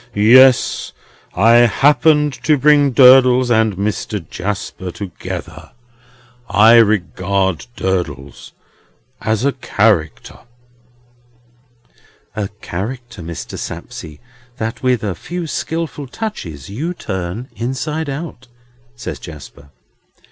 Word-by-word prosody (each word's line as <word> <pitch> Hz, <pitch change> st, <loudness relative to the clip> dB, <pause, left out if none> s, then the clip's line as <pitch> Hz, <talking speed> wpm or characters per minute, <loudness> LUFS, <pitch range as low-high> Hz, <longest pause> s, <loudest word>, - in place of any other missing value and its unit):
Yes. 125 Hz, +5 st, +5 dB, 0.4 s
I 115 Hz, +5 st, +5 dB
happened 145 Hz, +5 st, +3 dB
to 155 Hz, -2 st, +4 dB
bring 145 Hz, 0 st, +4 dB
Durdles 130 Hz, -1 st, +6 dB
and 110 Hz, -3 st, +2 dB
Mr. 100 Hz, -3 st, -3 dB
Jasper 95 Hz, 0 st, -5 dB
together. 90 Hz, 0 st, -8 dB, 0.8 s
I 110 Hz, +3 st, +6 dB
regard 95 Hz, -3 st, +1 dB
Durdles 80 Hz, -, -4 dB, 0.7 s
as 110 Hz, +3 st, -1 dB
a 140 Hz, -, +3 dB
Character." 100 Hz, -, -1 dB, 2.0 s
"A 105 Hz, -2 st, -2 dB
character, 115 Hz, +3 st, -6 dB
Mr. 80 Hz, -6 st, -7 dB
Sapsea, 75 Hz, -2 st, -8 dB, 0.4 s
that 115 Hz, -1 st, -4 dB
with 125 Hz, -4 st, +1 dB
a 100 Hz, -3 st, -1 dB
few 175 Hz, -, -6 dB
skilful 160 Hz, -2 st, -4 dB
touches 125 Hz, -, -6 dB
you 155 Hz, -, -4 dB
turn 95 Hz, -, -5 dB
inside 140 Hz, +7 st, -3 dB
out," 140 Hz, -3 st, -7 dB, 0.5 s
says 120 Hz, -, -7 dB
Jasper. 75 Hz, -3 st, -12 dB
115 Hz, 95 wpm, -17 LUFS, 95-135 Hz, 2.0 s, Durdles